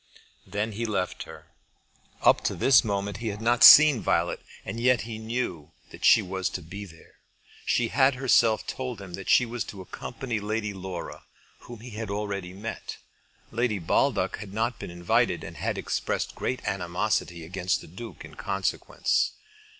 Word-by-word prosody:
Then 105 Hz, +3 st, -2 dB
he 115 Hz, +3 st, -3 dB
left 90 Hz, -4 st, -2 dB
her. -, -, -11 dB, 0.8 s
Up -, -, +5 dB
to -, -, 0 dB
this 130 Hz, -1 st, +5 dB
moment 100 Hz, -2 st, -2 dB
he 115 Hz, +1 st, -5 dB
had 105 Hz, -1 st, -3 dB
not 120 Hz, +2 st, +2 dB
seen 150 Hz, -6 st, +10 dB
Violet, -, -, +1 dB, 0.3 s
and 115 Hz, -, -5 dB
yet 125 Hz, 0 st, +3 dB
he 110 Hz, -1 st, -6 dB
knew 110 Hz, -9 st, -4 dB, 0.2 s
that -, -, -12 dB
she -, -, +6 dB
was 95 Hz, 0 st, -2 dB
to 90 Hz, -, -6 dB
be 100 Hz, +6 st, -8 dB
there. 80 Hz, -3 st, -17 dB, 0.5 s
She 120 Hz, -2 st, +2 dB
had 135 Hz, +1 st, +3 dB
herself 120 Hz, -4 st, +3 dB
told 125 Hz, -4 st, -5 dB
him 95 Hz, -3 st, -10 dB
that 100 Hz, +1 st, -6 dB
she 125 Hz, -, +5 dB
was 120 Hz, 0 st, -4 dB
to 100 Hz, -, -9 dB
accompany 110 Hz, +5 st, -5 dB
Lady 105 Hz, 0 st, -2 dB
Laura, 95 Hz, -2 st, -7 dB, 0.4 s
whom 120 Hz, -3 st, -11 dB
he 125 Hz, +1 st, -10 dB
had 110 Hz, 0 st, -5 dB
already 100 Hz, -3 st, -3 dB
met. 105 Hz, +5 st, -7 dB, 0.5 s
Lady 115 Hz, -2 st, 0 dB
Baldock 85 Hz, -4 st, +1 dB
had 100 Hz, -1 st, -9 dB
not 115 Hz, +2 st, -1 dB
been -, -, -6 dB
invited, 85 Hz, 0 st, +1 dB
and -, -, -9 dB
had -, -, -2 dB
expressed -, -, -2 dB
great 130 Hz, -, -3 dB
animosity 90 Hz, -2 st, -1 dB
against 90 Hz, +1 st, -1 dB
the -, -, -12 dB
Duke 110 Hz, +8 st, -9 dB
in -, -, -13 dB
consequence. 95 Hz, -1 st, -1 dB
105 Hz, 170 wpm, -27 LUFS, 95-120 Hz, 0.8 s, seen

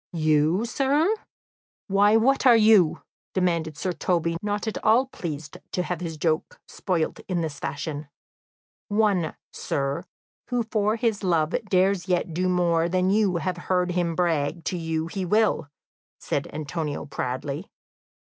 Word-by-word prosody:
"You, 155 Hz, +5 st, +2 dB
sir! 285 Hz, -, +2 dB, 0.7 s
Why, 205 Hz, +2 st, +4 dB
what 265 Hz, +4 st, +3 dB
are 240 Hz, -, +8 dB
you?" 215 Hz, -7 st, +5 dB, 0.3 s
demanded 170 Hz, -5 st, 0 dB
Sir 185 Hz, -, -1 dB
Toby, 170 Hz, -1 st, 0 dB
not 205 Hz, +1 st, -2 dB
at 220 Hz, -, -3 dB
all 230 Hz, +5 st, +5 dB
pleased 155 Hz, -, -6 dB, 0.2 s
to 180 Hz, -, 0 dB
have 180 Hz, -1 st, -4 dB
his 165 Hz, -3 st, -4 dB
joke 155 Hz, 0 st, -1 dB
spoilt 175 Hz, -5 st, -2 dB
in 180 Hz, -3 st, -1 dB
this 155 Hz, -4 st, -4 dB
fashion. 145 Hz, +1 st, -4 dB, 0.8 s
"One, 205 Hz, -6 st, +1 dB, 0.2 s
sir, 140 Hz, 0 st, -2 dB, 0.5 s
who 245 Hz, -1 st, +1 dB
for 215 Hz, -1 st, 0 dB
his 225 Hz, -2 st, 0 dB
love 165 Hz, -4 st, +2 dB
dares 190 Hz, -1 st, +2 dB
yet 175 Hz, -2 st, 0 dB
do 185 Hz, +3 st, 0 dB
more 170 Hz, -2 st, +2 dB
than 185 Hz, +1 st, +2 dB
you 205 Hz, -3 st, +2 dB
have 175 Hz, +2 st, -2 dB
heard 180 Hz, -1 st, +2 dB
him 175 Hz, -2 st, 0 dB
brag 165 Hz, -2 st, 0 dB
to 185 Hz, -, -2 dB
you 160 Hz, -1 st, -2 dB
he 185 Hz, +3 st, -4 dB
will," 210 Hz, -5 st, +2 dB, 0.5 s
said -, -, -2 dB
Antonio 150 Hz, 0 st, -4 dB
proudly. 140 Hz, +4 st, -4 dB
180 Hz, 145 wpm, -25 LUFS, 160-205 Hz, 0.8 s, are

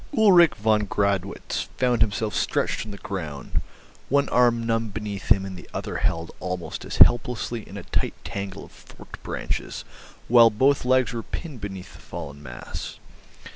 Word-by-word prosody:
Ulrich 180 Hz, -, +7 dB
von 105 Hz, -1 st, +2 dB
Gradwitz 100 Hz, -1 st, -1 dB
found 125 Hz, -3 st, +2 dB
himself 105 Hz, 0 st, +1 dB
stretched -, -, 0 dB
on -, -, -7 dB
the 100 Hz, -, -8 dB
ground, 80 Hz, -9 st, -4 dB, 0.5 s
one 140 Hz, +1 st, +3 dB
arm 120 Hz, -2 st, +3 dB
numb 115 Hz, -1 st, 0 dB
beneath 105 Hz, -1 st, -5 dB
him 95 Hz, -3 st, +5 dB
and 95 Hz, -1 st, -6 dB
the 90 Hz, -, -12 dB
other -, -, -3 dB
held 85 Hz, 0 st, -1 dB
almost 90 Hz, -1 st, -4 dB
as -, -, -5 dB
helplessly 120 Hz, -1 st, +3 dB
in 100 Hz, -, -8 dB
a 100 Hz, -, -7 dB
tight -, -, -1 dB
tangle 100 Hz, -1 st, -5 dB
of -, -, -17 dB
forked -, -, -13 dB
branches, -, -, -4 dB, 0.4 s
while 115 Hz, -1 st, +8 dB
both 130 Hz, +5 st, +2 dB
legs 130 Hz, -2 st, +3 dB
were 115 Hz, -, -3 dB
pinned 140 Hz, -1 st, -7 dB
beneath 95 Hz, -2 st, -7 dB
the -, -, -14 dB
fallen 70 Hz, 0 st, -8 dB
mass. 65 Hz, -4 st, -7 dB
105 Hz, 165 wpm, -25 LUFS, 95-120 Hz, 0.5 s, while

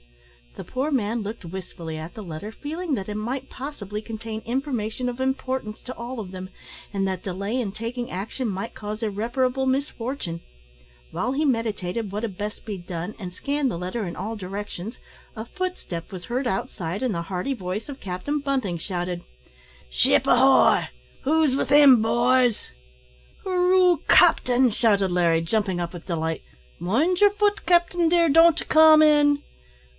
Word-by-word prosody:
The -, -, -7 dB
poor 265 Hz, +4 st, -2 dB
man 230 Hz, -3 st, 0 dB
looked 210 Hz, -1 st, -6 dB
wistfully 170 Hz, -2 st, -7 dB
at 160 Hz, +2 st, -7 dB
the 215 Hz, -, -7 dB
letter, 175 Hz, +4 st, -7 dB
feeling 310 Hz, +5 st, -3 dB
that 195 Hz, -4 st, -5 dB
it 210 Hz, -, -4 dB
might 250 Hz, +5 st, -4 dB
possibly 215 Hz, -7 st, -6 dB
contain 220 Hz, 0 st, -6 dB
information 250 Hz, -2 st, -2 dB
of 245 Hz, +1 st, -4 dB
importance 260 Hz, -4 st, -2 dB
to 255 Hz, -, -7 dB
all 240 Hz, +1 st, -6 dB
of 195 Hz, -4 st, -6 dB
them, 185 Hz, 0 st, -7 dB, 0.4 s
and 195 Hz, -1 st, 0 dB
that 185 Hz, -2 st, -3 dB
delay 200 Hz, +4 st, -3 dB
in 210 Hz, -5 st, -3 dB
taking 230 Hz, +3 st, -5 dB
action 215 Hz, +6 st, -3 dB
might 195 Hz, +4 st, -4 dB
cause 215 Hz, +1 st, -6 dB
irreparable 245 Hz, +5 st, 0 dB
misfortune. 260 Hz, -, -2 dB, 0.7 s
While 250 Hz, +3 st, -1 dB
he 300 Hz, +3 st, 0 dB
meditated 225 Hz, -5 st, -1 dB
what 210 Hz, +3 st, -4 dB
had 205 Hz, -5 st, -4 dB
best 210 Hz, +1 st, -5 dB
be 210 Hz, -3 st, -4 dB
done, 175 Hz, +2 st, -5 dB
and 185 Hz, -4 st, -6 dB
scanned 280 Hz, +6 st, -1 dB
the -, -, -4 dB
letter 185 Hz, +5 st, -3 dB
in 170 Hz, -, -5 dB
all 215 Hz, +4 st, -4 dB
directions, 205 Hz, +2 st, -6 dB, 0.4 s
a 220 Hz, -, -5 dB
footstep 295 Hz, -, -5 dB
was 185 Hz, -2 st, -7 dB
heard 250 Hz, +2 st, -2 dB
outside, 190 Hz, -3 st, -3 dB
and 255 Hz, -4 st, 0 dB
the 170 Hz, -, -1 dB
hearty 185 Hz, +9 st, -3 dB
voice 190 Hz, -1 st, -4 dB
of 280 Hz, -2 st, -8 dB
Captain 195 Hz, +11 st, -3 dB
Bunting 265 Hz, -11 st, -1 dB
shouted: 175 Hz, 0 st, -4 dB, 0.7 s
"Ship 65 Hz, 0 st, +3 dB
ahoy! -, -, +5 dB, 0.4 s
who's 305 Hz, -2 st, +3 dB
within, 280 Hz, -3 st, +6 dB
boys!" 240 Hz, -, +2 dB, 0.7 s
"Hooroo! 365 Hz, -2 st, +4 dB
capting," 250 Hz, 0 st, +5 dB
shouted 200 Hz, -5 st, +2 dB
Larry, 170 Hz, -2 st, +3 dB
jumping 190 Hz, 0 st, 0 dB
up 170 Hz, 0 st, -3 dB
with 175 Hz, -1 st, -10 dB
delight; 160 Hz, -2 st, -2 dB, 0.4 s
"mind 295 Hz, -, +1 dB
yer 410 Hz, -, +8 dB
fut, 410 Hz, 0 st, 0 dB
capting, 345 Hz, -1 st, +3 dB
dear; 340 Hz, 0 st, +4 dB
don't 330 Hz, +2 st, +5 dB
come 315 Hz, 0 st, +7 dB
in." 290 Hz, -1 st, +4 dB
225 Hz, 160 wpm, -24 LUFS, 190-270 Hz, 0.7 s, yer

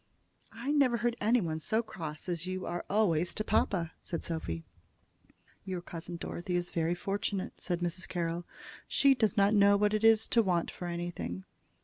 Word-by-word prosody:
"I 235 Hz, +6 st, -3 dB
never 275 Hz, -5 st, +4 dB
heard 235 Hz, 0 st, 0 dB
anybody 205 Hz, -8 st, +2 dB
so 220 Hz, +8 st, 0 dB
cross 160 Hz, -8 st, -7 dB
as 175 Hz, -1 st, -2 dB
you 185 Hz, 0 st, -3 dB
always 175 Hz, -2 st, +1 dB
are -, -, -21 dB
to 215 Hz, -, 0 dB
papa," 175 Hz, -5 st, +1 dB
said 170 Hz, -, -4 dB
Sophy. 85 Hz, -, -3 dB, 1.0 s
"Your 185 Hz, -2 st, -3 dB
cousin 175 Hz, 0 st, -7 dB
Dorothy 175 Hz, +2 st, -4 dB
is 175 Hz, 0 st, -1 dB
very 165 Hz, +1 st, 0 dB
fortunate," 195 Hz, +1 st, -3 dB
said 175 Hz, -2 st, -2 dB
Mrs. 175 Hz, +1 st, -2 dB
Carroll. 170 Hz, -1 st, -2 dB, 0.4 s
"She 275 Hz, -1 st, +5 dB
does 220 Hz, -6 st, +1 dB
not 200 Hz, +1 st, +5 dB
know 200 Hz, -1 st, +6 dB
what 210 Hz, +1 st, +2 dB
it 215 Hz, 0 st, 0 dB
is 225 Hz, -1 st, +6 dB
to 235 Hz, -, +5 dB
want 180 Hz, -5 st, 0 dB
for 180 Hz, -, -6 dB
anything." 170 Hz, -, -4 dB
180 Hz, 170 wpm, -31 LUFS, 170-215 Hz, 1.0 s, know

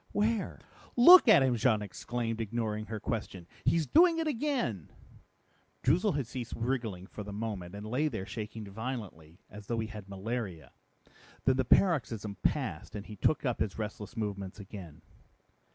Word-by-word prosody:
"Where?" 215 Hz, +1 st, 0 dB, 0.4 s
"Look 345 Hz, +8 st, +9 dB
at 215 Hz, -11 st, +8 dB
him!" 130 Hz, -2 st, +2 dB
Jean 110 Hz, -2 st, +2 dB
exclaimed, 115 Hz, +3 st, -3 dB
ignoring 110 Hz, -1 st, -2 dB
her 110 Hz, 0 st, -4 dB
question. 105 Hz, -5 st, -4 dB, 0.2 s
"He's 165 Hz, -2 st, +3 dB
doing 335 Hz, -, +5 dB
it 325 Hz, -, 0 dB
again!" 245 Hz, -, -1 dB, 0.9 s
Droozle 175 Hz, +8 st, +3 dB
had 140 Hz, -3 st, -1 dB
ceased 120 Hz, 0 st, -6 dB
wriggling 115 Hz, -6 st, -2 dB
for 105 Hz, -, -9 dB
the 105 Hz, 0 st, -7 dB
moment 100 Hz, -4 st, -5 dB
and 105 Hz, +1 st, -7 dB
lay 130 Hz, +8 st, 0 dB
there 110 Hz, -9 st, -4 dB
shaking 110 Hz, 0 st, -6 dB
violently, 100 Hz, -7 st, -6 dB
as 105 Hz, -1 st, -12 dB
though 115 Hz, -, -1 dB
he 110 Hz, -, -1 dB
had 105 Hz, -3 st, -9 dB
malaria. 95 Hz, -, -4 dB, 0.7 s
Then 130 Hz, -1 st, +4 dB
the 130 Hz, -, +1 dB
paroxysm 115 Hz, -, +2 dB
passed -, -, -1 dB
and 105 Hz, -1 st, -6 dB
he 105 Hz, -, -9 dB
took 150 Hz, +9 st, +1 dB
up 125 Hz, -3 st, 0 dB
his 105 Hz, -, -1 dB
restless 105 Hz, +1 st, -6 dB
movements 100 Hz, -3 st, -4 dB
again. 95 Hz, -6 st, -10 dB
110 Hz, 160 wpm, -31 LUFS, 100-130 Hz, 0.9 s, Look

